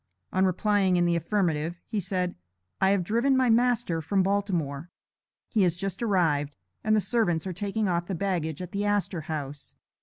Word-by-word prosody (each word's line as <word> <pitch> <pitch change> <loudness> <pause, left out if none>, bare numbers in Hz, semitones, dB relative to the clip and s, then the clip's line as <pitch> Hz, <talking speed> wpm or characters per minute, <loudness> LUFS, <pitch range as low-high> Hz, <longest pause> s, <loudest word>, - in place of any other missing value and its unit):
On 190 +1 +3
replying 195 0 +2
in 175 -1 +3
the 170 0 +2
affirmative, 170 -2 0
he 215 - -2
said: 180 -1 -1 0.5
"I 190 - +5
have 195 -2 +2
driven 235 +8 +2
my 255 -2 +3
master 235 -7 +2
from 190 +5 +1
Baltimore. 175 -7 -1 0.6
He 220 - +1
has 180 -3 +3
just 195 +3 -4
arrived, 160 -10 +1 0.3
and 215 0 +3
the - - +4
servants 195 -7 +1
are 185 - -3
taking 205 +3 -1
off 175 -1 0
the 195 - -2
baggage 170 -3 -2
at 180 - -8
the 200 +1 -2
Astor 205 -4 0
House. 145 -3 -6
185 Hz, 180 wpm, -27 LUFS, 170-205 Hz, 0.6 s, I